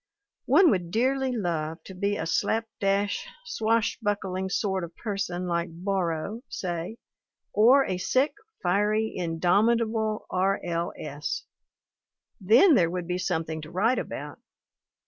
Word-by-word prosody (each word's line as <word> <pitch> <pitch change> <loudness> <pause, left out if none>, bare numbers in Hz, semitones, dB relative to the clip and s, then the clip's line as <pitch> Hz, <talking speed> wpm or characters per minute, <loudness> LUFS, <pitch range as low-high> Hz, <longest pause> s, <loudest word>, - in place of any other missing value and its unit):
One 365 -5 +6
would 180 -3 -1
dearly 260 +6 +1
love 165 -8 -2
to 190 - -10
be 200 +2 -1
a - - -3
slap 225 +6 +1
dash, 200 - 0 0.2
swashbuckling 205 - -1
sort 190 -2 -1
of 170 0 -8
person 195 -4 -3
like 170 0 -1
Borrow, 185 +3 -2
say; 175 +4 -4 0.6
or 250 +6 +6
a 180 - -2
sick, 260 +9 +2 0.3
fiery, 210 +4 +1
indomitable 215 +6 +1
R. 190 +2 +1
L. 170 -1 -2
S. 150 -1 -4 1.0
Then 230 - +6
there 170 -10 +4
would 180 0 -3
be 180 0 -1
something 160 -3 -2
to 155 - -9
write 210 +9 +2
about. - - -6
195 Hz, 125 wpm, -27 LUFS, 175-220 Hz, 1.0 s, One